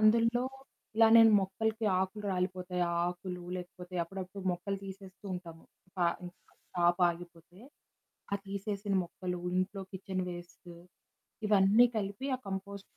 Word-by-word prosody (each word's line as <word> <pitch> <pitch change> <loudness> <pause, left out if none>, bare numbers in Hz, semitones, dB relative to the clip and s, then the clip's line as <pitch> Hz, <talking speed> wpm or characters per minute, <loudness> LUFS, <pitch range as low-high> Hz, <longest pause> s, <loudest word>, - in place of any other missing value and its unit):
అందులో 230 +3 +5 0.5
ఇలా 225 0 +8
నేను 225 -1 +9
మొక్కలకి 220 +3 -1
ఆకులు 190 +3 -3
రాలిపోతాయి 180 0 -1
ఆ - - -1
ఆకులు 180 0 -4
లేకపోతే 180 0 -8
అప్పుడప్పుడు 190 +2 -6
మొక్కలు 190 +3 -3
తీసేస్తూ 190 +1 -10
ఉంటాము 165 -2 -8 0.3
ప - - -9 0.3
ఇంక 175 - -7 0.4
క్రాప్ 175 0 +3
ఆగిపోతే, 175 0 -8 0.7
ఆ - - +3
తీసేసిన 200 0 -2
మొక్కలు, 180 0 -5 0.2
ఇంట్లో 195 +1 -1
కిచెన్ 190 0 -3
వేస్టు 175 0 -10 0.7
ఇవన్నీ 205 +3 +6
కలిపి 205 +4 -2
ఆ - - -19
కంపోస్ట్ 195 +1 -4
190 Hz, 125 wpm, -32 LUFS, 180-200 Hz, 0.7 s, నేను